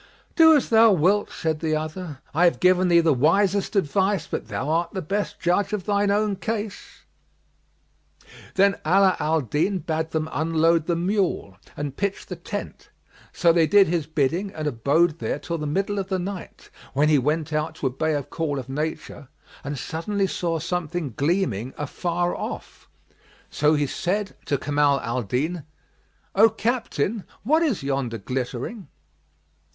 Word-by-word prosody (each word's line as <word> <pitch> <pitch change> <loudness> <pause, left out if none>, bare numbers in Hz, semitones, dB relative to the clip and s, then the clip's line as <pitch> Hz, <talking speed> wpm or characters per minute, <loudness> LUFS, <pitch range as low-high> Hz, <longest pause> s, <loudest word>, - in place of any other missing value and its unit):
"Do 320 -1 +7
as 280 - -2
thou 225 0 +6
wilt," 190 +5 +2
said 160 -2 -2
the 155 -1 0
other 155 -2 -5
"I 170 +4 +4
have 175 - +3
given 185 0 +4
thee 170 -1 +5
the 160 -2 +3
wisest 195 - +2
advice, 195 +2 +1
but - - -5
thou 140 - -3
art 165 +2 0
the 190 - -3
best 200 +6 -3
judge 180 +4 +1
of 200 -4 -2
thine 205 0 +1
own 205 -1 +1
case." 215 -1 -5 1.5
Then 195 -1 +4
Ala 190 +3 +4
al 160 +1 +1
Din 150 - 0
bade 160 -2 -2
them 160 -1 -2
unload 165 +1 +2
the 170 - +1
mule; 180 - -1 0.2
and 145 -2 -4
pitch 200 0 -2
the 180 - -6
tent; 205 +4 -7 0.4
so 170 -1 +3
they 165 -2 +4
did 200 0 +6
his 165 -3 -1
bidding 160 +6 0
and 155 - -4
abode 150 +6 +2
there - - -2
till 170 -1 -4
the 150 - -3
middle 195 +6 -1
of 190 - -3
the 190 -1 -1
night, 185 0 -7 0.2
when 145 +3 +3
he 150 -2 +4
went 155 +3 -1
out 155 +1 -1
to - - -6
obey 155 +4 0
a 145 - -1
call 150 0 -3
of 130 - -5
nature 150 0 -4 0.4
and 145 0 -4
suddenly 195 +8 -2
saw 170 -3 -1
something 165 -3 -3
gleaming 135 - -1
afar 175 +4 -2
off. - - -7 0.6
So 150 +1 +3
he 145 -1 +1
said 195 +8 -2
to 140 - +1
Kamal 145 0 +2
al 120 +2 -2
Din, 145 - -2 0.7
"O 220 +3 +6
captain, 225 - -1 0.2
what 310 +9 +3
is 280 - 0
yonder 135 -4 -2
glittering?" 125 - -4
165 Hz, 165 wpm, -24 LUFS, 150-195 Hz, 1.5 s, Do